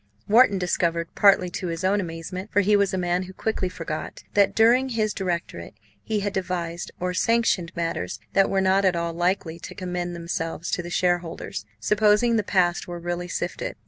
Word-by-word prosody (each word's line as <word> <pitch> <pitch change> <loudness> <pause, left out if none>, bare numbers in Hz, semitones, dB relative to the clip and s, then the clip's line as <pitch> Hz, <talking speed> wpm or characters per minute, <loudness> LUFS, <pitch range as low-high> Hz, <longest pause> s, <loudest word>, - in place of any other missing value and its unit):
Wharton 215 -1 +5
discovered, 170 -2 0
partly 190 -3 +4
to 180 - -4
his 165 +1 -4
own 200 +2 +2
amazement, 180 +3 -6
for 205 - +4
he 205 +2 +3
was 200 -1 +2
a 190 - -1
man 175 0 0
who 185 0 -8
quickly 195 -2 -2
forgot, 165 -3 -6
that 200 -1 +3
during 245 +4 +4
his 215 -3 0
directorate 175 -3 -4 0.3
he 215 -2 -1
had 200 0 -2
devised 175 -3 -3
or 180 0 -1
sanctioned 205 -4 +1
matters 140 - -3
that 195 - +4
were 195 - +1
not 190 +1 +3
at 185 -2 +3
all 170 0 -2
likely 175 -1 -1
to - - -9
commend 180 -1 -4
themselves 170 0 -4
to - - 0
the 175 - -8
shareholders, 175 - -1
supposing 210 - +3
the 220 - +3
past 180 -3 +1
were 175 -1 -5
really 175 +1 -4
sifted. - - -4
180 Hz, 185 wpm, -24 LUFS, 170-200 Hz, 0.3 s, Wharton